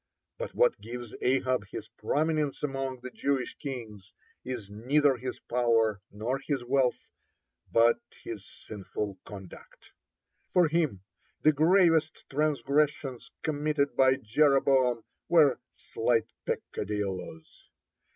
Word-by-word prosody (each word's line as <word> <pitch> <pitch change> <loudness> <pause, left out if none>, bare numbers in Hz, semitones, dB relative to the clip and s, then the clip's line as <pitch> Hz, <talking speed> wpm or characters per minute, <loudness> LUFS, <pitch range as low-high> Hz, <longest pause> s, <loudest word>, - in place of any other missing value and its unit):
(33) - - -2
But - - -7
what - - +4
gives 120 -1 -7
Ahab 130 -2 +1
his - - -7
prominence 155 -2 -1
among 135 -3 -3
the 130 0 -7
Jewish 135 -1 -1
kings 110 -8 -7 0.3
is 125 -5 -5
neither 135 +7 +2
his 125 +1 -5
power 115 -4 +2
nor 115 +6 -2
his 140 -3 -2
wealth, 130 0 +2 0.7
but 115 +1 +5 0.2
his - - -6
sinful 100 -1 -6
conduct. 95 -3 -12 0.6
For 180 -2 +5
him 155 - 0 0.4
the 155 - +6
gravest 165 0 +3
transgressions 140 -2 0
committed 150 -1 0
by 130 0 +5
Jeroboam 130 -1 +3 0.3
were 150 -7 +5
slight 115 -1 0 0.2
peccadilloes. 95 -5 -4
130 Hz, 110 wpm, -29 LUFS, 115-150 Hz, 0.7 s, the